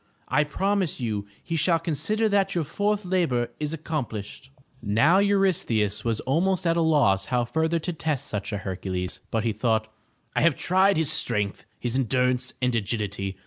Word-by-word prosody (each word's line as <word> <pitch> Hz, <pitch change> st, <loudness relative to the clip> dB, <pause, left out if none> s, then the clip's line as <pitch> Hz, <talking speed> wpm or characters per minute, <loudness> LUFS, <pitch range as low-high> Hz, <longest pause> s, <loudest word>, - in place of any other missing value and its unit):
I 150 Hz, +4 st, +3 dB
promise 190 Hz, +3 st, -1 dB
you 105 Hz, -4 st, -3 dB, 0.2 s
he 165 Hz, -, -3 dB
shall 165 Hz, +1 st, +3 dB
consider 165 Hz, +7 st, 0 dB
that 200 Hz, -2 st, +1 dB
your 170 Hz, -, +1 dB
fourth 205 Hz, +6 st, -1 dB
labor 165 Hz, -10 st, +1 dB
is 150 Hz, 0 st, -2 dB
accomplished/' 130 Hz, -6 st, -5 dB, 0.3 s
Now 115 Hz, -, +4 dB
Eurystheus 190 Hz, -, +1 dB
was 115 Hz, -2 st, -1 dB
almost 180 Hz, +8 st, +1 dB
at 165 Hz, 0 st, +3 dB
a 170 Hz, -, +2 dB
loss 130 Hz, -12 st, +3 dB
how 125 Hz, -1 st, +1 dB
further 160 Hz, +6 st, 0 dB
to 175 Hz, +2 st, -3 dB
test 150 Hz, -4 st, -2 dB
such 105 Hz, -4 st, -4 dB
a 105 Hz, -, -2 dB
Hercules, 95 Hz, -1 st, -4 dB
but 110 Hz, -1 st, -1 dB
he 115 Hz, -2 st, 0 dB
thought: 110 Hz, 0 st, 0 dB, 0.4 s
"I -, -, +2 dB
have 165 Hz, -3 st, +4 dB
tried 190 Hz, +5 st, +3 dB
his 160 Hz, -2 st, +3 dB
strength, 105 Hz, -9 st, -1 dB
his 120 Hz, 0 st, -2 dB
en 135 Hz, -1 st, +2 dB
durance 125 Hz, +1 st, +1 dB
and 125 Hz, 0 st, +2 dB
agility. 100 Hz, -3 st, -2 dB
135 Hz, 175 wpm, -25 LUFS, 110-170 Hz, 0.4 s, Now